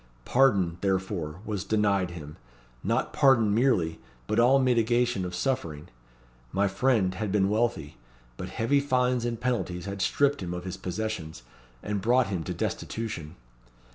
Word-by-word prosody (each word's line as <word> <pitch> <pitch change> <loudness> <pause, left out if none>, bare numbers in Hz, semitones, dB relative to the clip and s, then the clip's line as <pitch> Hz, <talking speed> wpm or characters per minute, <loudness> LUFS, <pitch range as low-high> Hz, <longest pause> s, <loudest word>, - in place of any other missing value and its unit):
Pardon, 100 -10 +3
therefore, 95 -4 -2
was 105 -3 -3
denied 100 -4 +1
him 75 -4 -9 0.5
not - - 0
pardon 120 -7 +4
merely, 105 -9 +2 0.3
but 110 - 0
all 125 +3 +6
mitigation 120 -3 +2
of 90 0 -5
suffering. 85 - -2 0.6
My 100 +1 +2
friend 100 -2 +1
had 100 +1 -3
been 100 -1 +2
wealthy; 105 -9 -1 0.4
but - - -6
heavy 140 +6 +1
fines 125 -3 +1
and 115 -2 -2
penalties 95 -8 -2
had 100 0 -5
stripped 145 +3 +2
him 90 -1 -4
of 90 - -5
his 95 -1 -4
possessions, 95 - -4 0.4
and 105 -1 -2
brought 120 +1 +3
him 90 -5 -2
to - - -3
destitution. 105 -9 -4
105 Hz, 145 wpm, -27 LUFS, 90-120 Hz, 0.6 s, all